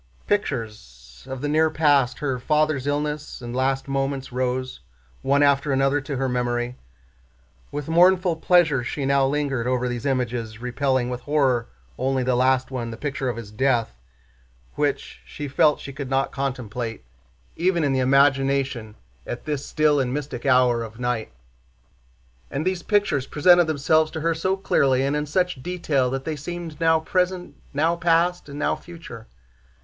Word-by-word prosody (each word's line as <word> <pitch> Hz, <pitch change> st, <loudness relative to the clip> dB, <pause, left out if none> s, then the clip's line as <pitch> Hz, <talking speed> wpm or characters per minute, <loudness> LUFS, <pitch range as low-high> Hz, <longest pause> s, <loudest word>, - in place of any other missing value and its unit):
Pictures 105 Hz, -, -4 dB
of 130 Hz, -1 st, -5 dB
the 145 Hz, -, -1 dB
near 160 Hz, +2 st, +3 dB
past—her 145 Hz, -3 st, +1 dB
father's 150 Hz, 0 st, +1 dB
illness 150 Hz, +1 st, -2 dB
and 120 Hz, -1 st, -7 dB
last 135 Hz, +1 st, 0 dB
moments—rose 130 Hz, -2 st, -2 dB, 0.4 s
one 140 Hz, +2 st, +3 dB
after 140 Hz, 0 st, +3 dB
another 135 Hz, +2 st, +2 dB
to 135 Hz, +1 st, -5 dB
her 135 Hz, +1 st, 0 dB
memory. 120 Hz, 0 st, -1 dB, 1.0 s
With 145 Hz, -1 st, -5 dB
mournful 175 Hz, +1 st, +4 dB
pleasure 160 Hz, -6 st, +3 dB
she 135 Hz, +2 st, -3 dB
now 135 Hz, 0 st, +3 dB
lingered 135 Hz, -4 st, -1 dB
over 125 Hz, 0 st, 0 dB
these 120 Hz, +2 st, -3 dB
images, 120 Hz, -4 st, -2 dB
repelling 125 Hz, 0 st, 0 dB
with 125 Hz, 0 st, -4 dB
horror 135 Hz, -4 st, +1 dB, 0.3 s
only 130 Hz, 0 st, 0 dB
the 125 Hz, 0 st, +1 dB
last 130 Hz, +1 st, +2 dB
one, 120 Hz, -3 st, -3 dB
the 115 Hz, -, -7 dB
picture 140 Hz, -1 st, -3 dB
of 120 Hz, -, -4 dB
his 110 Hz, -3 st, -8 dB
death, 120 Hz, -, +1 dB, 0.8 s
which 65 Hz, -, -2 dB
she 145 Hz, -, -7 dB
felt 150 Hz, +2 st, +3 dB
she 140 Hz, -, -8 dB
could 140 Hz, -1 st, -6 dB
not 135 Hz, 0 st, 0 dB
contemplate 125 Hz, -, -4 dB, 0.5 s
even 175 Hz, -1 st, +1 dB
in 140 Hz, -2 st, +1 dB
imagination 135 Hz, -3 st, +2 dB, 0.3 s
at 120 Hz, -, -6 dB
this 150 Hz, -2 st, -2 dB
still 150 Hz, -2 st, +2 dB
and 125 Hz, -2 st, 0 dB
mystic 140 Hz, -2 st, -4 dB
hour 125 Hz, -2 st, +4 dB
of 115 Hz, 0 st, -8 dB
night. 120 Hz, -, -2 dB, 1.2 s
And 145 Hz, +4 st, -3 dB
these 185 Hz, -1 st, 0 dB
pictures 205 Hz, -11 st, +1 dB
presented 175 Hz, +3 st, +5 dB
themselves 155 Hz, +1 st, +2 dB
to 160 Hz, -, -4 dB
her 165 Hz, +1 st, +1 dB
so 185 Hz, +4 st, -1 dB
clearly 135 Hz, -8 st, +2 dB
and 140 Hz, +2 st, 0 dB
in 150 Hz, 0 st, -2 dB
such 180 Hz, -2 st, 0 dB
detail 150 Hz, -6 st, 0 dB
that 135 Hz, +1 st, -4 dB
they 160 Hz, -, -2 dB
seemed 165 Hz, +2 st, -7 dB
now 160 Hz, -1 st, +4 dB
present, 180 Hz, +1 st, -1 dB, 0.2 s
now 160 Hz, +4 st, +1 dB
past, 170 Hz, 0 st, +1 dB
and 140 Hz, -, -8 dB
now -, -, 0 dB
future. 165 Hz, -10 st, -11 dB
135 Hz, 155 wpm, -23 LUFS, 125-155 Hz, 1.2 s, presented